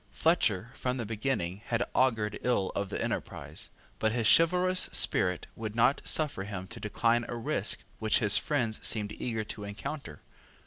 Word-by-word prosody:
Fletcher, 120 - +1
from 125 0 -2
the 120 - -3
beginning, 105 -4 -2
had 120 -4 0
augured 110 -5 +1
ill 120 -6 +1
of 100 -1 -2
the - - -3
enterprise: - - -4 0.3
but 110 - +2
his 115 0 -1
chivalrous 180 +2 +2
spirit 90 -2 +2
would 110 -1 -5
not 120 +4 +3
suffer 150 -10 0
him 100 -2 -5
to - - -8
decline 115 +2 +1
a 120 - -4
risk 115 - 0 0.2
which 110 -1 +2
his 105 -4 +4
friends 120 -7 +1
seemed 105 -2 +1
eager 115 0 -3
to 105 0 -7
encounter. 100 - -6
115 Hz, 165 wpm, -30 LUFS, 105-130 Hz, 0.3 s, his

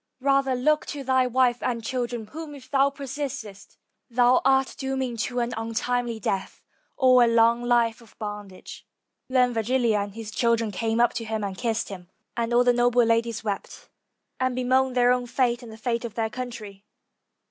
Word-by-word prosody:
Rather 275 -1 +2
look 300 +5 +1
to 285 -2 -5
thy 260 -1 +2
wife 250 -1 +2
and 235 -2 -2
children, 240 -1 -3
whom 300 +5 -8
if 265 -3 -14
thou 275 0 +4
persistest 265 -8 -7 0.3
thou 245 +1 +4
art 265 0 +3
dooming 265 -2 -2
to 245 +2 -2
an 240 0 -1
untimely 230 +1 -2
death, 195 -2 -3 0.3
or 255 -2 +6
a - - +4
long 230 +1 +4
life 240 -1 +1
of 230 - -20
bondage." 205 -3 -8 0.4
Then 250 -1 +3
Virgilia 230 -1 +1
and 200 0 -5
his 225 -2 -7
children 230 -1 +1
came 225 +3 -1
up 240 0 +4
to 235 - -4
him 220 -1 -3
and 195 -1 -3
kissed 230 0 -2
him, 180 -3 -9 0.3
and 235 0 -2
all 240 +1 +4
the 245 0 +4
noble 245 0 +3
ladies 230 0 0
wept, 205 -2 -5 0.5
and 255 -1 0
bemoaned 255 +1 +1
their 245 0 +5
own 250 -1 0
fate 240 0 0
and 235 -2 -10
the 220 - -11
fate 235 +1 -2
of 230 -2 -6
their 225 -1 -1
country. 215 -5 -7
240 Hz, 180 wpm, -25 LUFS, 225-255 Hz, 0.5 s, or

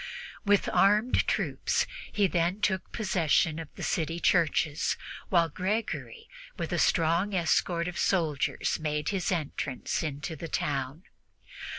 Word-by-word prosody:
With 205 -1 +3
armed 210 +5 +3
troops - - 0 0.3
he 205 - +2
then 175 +2 +1
took 190 -3 -1
possession 165 -6 +1
of 160 -2 -7
the - - -7
city 165 +1 -1
churches, 160 -3 +2 0.3
while 170 -3 +4
Gregory, 215 - -3 0.3
with - - -3
a - - +1
strong 170 +4 +2
escort 170 0 +1
of 180 - -4
soldiers, 160 -7 0
made 150 -1 -1
his 195 -3 -1
entrance 145 -5 -2
into 155 +1 -4
the 165 +2 -6
town. 140 +3 -2
170 Hz, 125 wpm, -29 LUFS, 155-190 Hz, 0.3 s, while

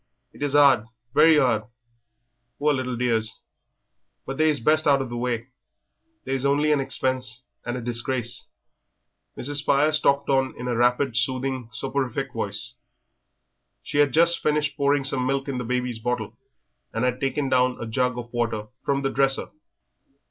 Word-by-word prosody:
It - - -16
is 145 -1 0
'ard, 135 -6 +6 0.3
very 155 0 +6
'ard, 120 -6 +2 0.9
poor 150 0 +2
little 130 -2 -2
dears, 115 -2 -1 0.9
but 135 - -5
they 155 0 +4
is 150 -2 +1
best 155 +6 +2
out 140 -1 +5
of 135 -2 -4
the 120 - -5
way 120 0 -2 0.8
they 135 - -2
is 135 -1 0
only 145 +2 +2
an 150 - +3
expense 130 -2 -2 0.2
and 120 +1 -2
a - - -5
disgrace." 120 0 -2 0.9
Mrs. 145 +3 -2
Spires 150 +2 +3
talked 140 -1 +2
on 135 -1 +1
in 125 - -5
a 120 - 0
rapid, 125 +1 +2
soothing, 130 -1 -1
soporific 135 -1 -3
voice. 110 +2 -4 1.1
She 145 - -2
had 145 -2 +4
just 170 +4 +4
finished 150 0 0
pouring 140 -1 +2
some 130 -2 -1
milk 135 +1 -1
in 135 -3 -3
the - - -3
baby's 125 -1 -2
bottle 120 -1 -3 0.6
and 115 +3 -1
had 125 0 0
taken 135 +1 -1
down 125 -1 +2
a - - -4
jug 125 +2 0
of 120 0 -7
water 115 -3 -2
from 140 0 0
the 135 - 0
dresser. 135 0 +1
130 Hz, 165 wpm, -24 LUFS, 120-140 Hz, 1.1 s, ard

